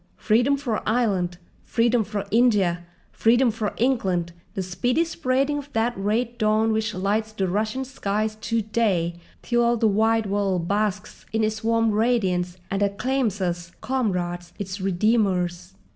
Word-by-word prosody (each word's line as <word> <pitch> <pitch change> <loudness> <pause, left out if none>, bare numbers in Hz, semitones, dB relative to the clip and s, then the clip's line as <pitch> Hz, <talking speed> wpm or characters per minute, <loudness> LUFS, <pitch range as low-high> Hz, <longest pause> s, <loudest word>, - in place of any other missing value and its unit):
Freedom 245 +6 +2
for 245 -6 -2
Ireland, 195 -7 +1 0.3
freedom 235 -1 +2
for 205 -1 -4
India, 200 -7 +3 0.3
freedom 240 +2 +3
for 215 -1 -3
England, 190 -9 0 0.2
the 190 - -1
speedy 245 - 0
spreading 290 -2 0
of 285 0 -10
that 225 +2 +1
red 225 +5 -1
dawn 215 +1 +2
which 220 -2 -1
lights 210 +4 0
the 195 -3 -1
Russian 215 +7 -1
skies 215 -4 -2
to 230 -1 0
day, 190 -6 0 0.2
till 240 0 +2
all 235 0 +2
the 225 - +3
wide 220 +2 +2
world 195 -4 0
basks 205 0 -2
in 220 0 0
its 220 +1 -1
warm 225 0 +2
radiance 190 -6 +1
and 195 +1 -1
acclaims 210 +1 0
us, 175 -1 -3
comrades, 175 -9 -2
its 195 0 -5
redeemers!" 185 -3 0
215 Hz, 145 wpm, -24 LUFS, 190-235 Hz, 0.3 s, India